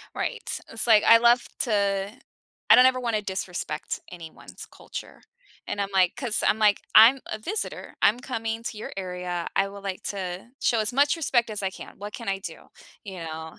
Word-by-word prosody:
Right. - - -3
It's 225 - -4
like, 220 -3 +6
I 230 - +8
love 240 +1 +5 0.2
to 200 -4 0 0.6
I - - +11
don't 250 - +8
ever 255 0 +2
wanna 230 -4 -1
disrespect 185 -5 -4
anyone's 170 -3 -11
culture - - -9 0.5
and 205 - -3
I'm 200 - -1
like, 185 -2 +3
'cause 240 -5 -2
I'm 215 - +3
like, 210 -2 +3
"I'm 245 +5 +8
a 215 - -4
visitor, 410 - -5
I'm 225 +4 +4
coming 225 -3 -4
to 220 - -5
your - - -7
area, 180 -2 -4
I 195 0 +2
would 200 0 -11
like 190 -2 -4
to 185 0 -5
show 230 - +2
as 215 +3 -1
much 285 +3 +3
respect 240 -8 +1
as 210 -2 -4
I 190 - +1
can, - - -11
what 205 +1 -8
can 230 -4 -7
I 195 0 0
do?" 195 - -10 0.4
You 190 -3 -8
know? 160 0 -8
210 Hz, 195 wpm, -25 LUFS, 190-230 Hz, 0.6 s, I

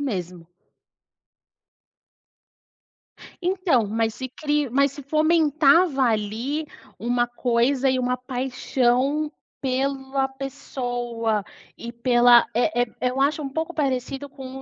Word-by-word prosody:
mesmo. 180 -10 -4 3.0
Então, 350 - +1
mas 225 +1 0
se 260 - -5
cri 295 +1 -1
mas 275 +2 +2
se 285 - -10
fomentava 310 0 +3
ali, 230 +7 -1 0.3
uma 240 +1 0
coisa 250 +2 +1
e 260 0 +1
uma 250 0 0
paixão 255 +3 0 0.3
pela 270 0 -1
pessoa 245 -5 -3 0.3
e 235 0 -7
pela, 240 0 +5
eh 245 +1 +2
eh - - -3 0.2
eh, 250 - +2
eu 265 - -4
acho 290 +2 +1
um 275 - -4
pouco 320 +4 -3
parecido 270 -1 -2
com 265 -1 -9
260 Hz, 110 wpm, -23 LUFS, 240-280 Hz, 3.0 s, pela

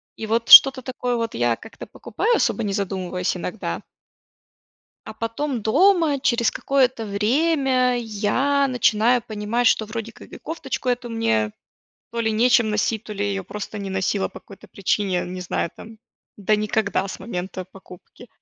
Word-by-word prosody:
И 220 - -6
вот 230 +1 -1
что-то 270 -1 +10
такое, 250 -1 -3
вот, 230 -1 -3
я 120 0 +1
как-то 225 - -12
покупаю, 475 - -1
особо 235 - 0
не 200 -2 -2
задумываясь 185 -2 -2
иногда. 175 - -5 1.3
А - - -7
потом 230 +3 -3
дома, 330 - +3
через 235 -3 +1
какое-то 255 -4 0
время, 255 +4 +1
я 240 +6 0
начинаю 245 -1 +2
понимать, 220 +1 0
что 220 - +1
вроде 225 +1 -6
как - - -16
и - - -9
кофточку 270 -6 -5
эту 245 0 -1
мне, 110 - 0 0.6
то 235 - -2
ли 225 -1 0
нечем 230 +1 +3
носить, 215 +1 -1
то 215 - -8
ли 205 0 -3
я 205 - -1
её 195 -1 -3
просто 210 +2 -7
не 200 -1 -5
носила 190 +1 -1
по - - -11
какой-то 200 - -16
причине, 195 0 -1
я 180 - 0
не 180 +1 -7
знаю, 175 -2 -2
там, 225 0 -13 0.4
да 210 +1 +1
никогда 210 -2 -1
с - - -7
момента 185 -3 -6
покупки. 190 +5 -15
220 Hz, 165 wpm, -22 LUFS, 200-245 Hz, 1.3 s, что-то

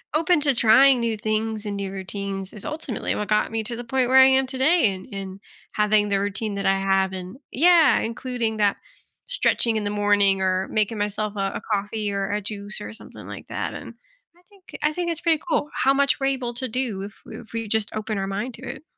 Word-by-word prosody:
open 330 +2 +3
to 280 -3 +2
trying 255 +3 +6
new 230 -2 -1
things 215 0 -2
and 205 -1 -3
new 200 -1 -4
routines 195 0 -5
is 210 - -9
ultimately 300 -7 -3
what 210 - -3
got 210 +2 +1
me 225 0 -1
to 235 +2 -3
the 240 - -6
point 255 +1 0
where 260 +1 +4
I 265 - +10
am 265 0 +3
today 265 - +3
and 185 - -11
and 195 -1 -7 0.3
having 210 0 +3
the 200 -1 +1
routine 205 +1 -2
that 200 - -3
I 195 0 +3
have 195 0 +1
and 185 +4 -7
Yeah, 330 0 +5
including 230 -1 -2
that 205 -2 +2 0.5
stretching 365 - +2
in 215 - -1
the 205 - -1
morning 205 -2 +3
or 185 0 0
making 215 +1 +1
myself 210 0 -2
a 195 -1 -1
a - - -4
coffee 205 +1 -2
or 195 0 -2
a 205 +1 -1
juice 205 0 -4
or 210 - -7
something 225 - -10
like - - -9
that - - -4
and - - -9 0.4
I - - -24
think 395 -3 -13
I 300 - +2
think 345 +1 -2
it's 335 0 -4
pretty 330 -3 +2
cool 300 -2 0
how 270 - +3
much 280 0 +2
we're 270 - 0
able 255 -3 -2
to 255 +1 -2
do 230 -5 -1
if 200 +1 -9
if 220 0 -11
we 225 -1 -3
just 215 0 -1
open 215 0 -3
our 195 0 -2
mind 205 +6 -4
to 240 - -14
it. 270 - -8
215 Hz, 230 wpm, -23 LUFS, 200-260 Hz, 0.5 s, I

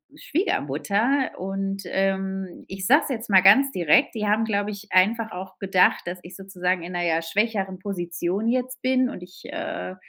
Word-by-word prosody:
Schwiegermutter. 240 - 0
Und, 195 +1 -3
ähm, 190 0 -2
ich 190 0 -6
sage 285 +9 +6
es - - -5
jetzt 230 -3 -4
mal 190 -2 +6
ganz 260 +9 +6
direkt. 175 - +3
Die 210 -1 -2
haben, 215 +2 +2
glaub 205 -2 -1
ich, 205 0 -7
einfach 220 +5 +3
auch 185 +1 -8
gedacht, 190 -2 +3
dass 180 +1 -5
ich 175 - -11
sozusagen 185 -2 -2
in 180 +1 -7
'ner, 175 0 -1
ja, 165 0 +1
schwächeren 195 +1 -1
Position 180 +1 -3
jetzt 255 0 -2
bin 255 -1 +2
und 180 - -8
ich, 180 +1 -15
äh 90 +1 -5
195 Hz, 180 wpm, -24 LUFS, 180-225 Hz, -, sage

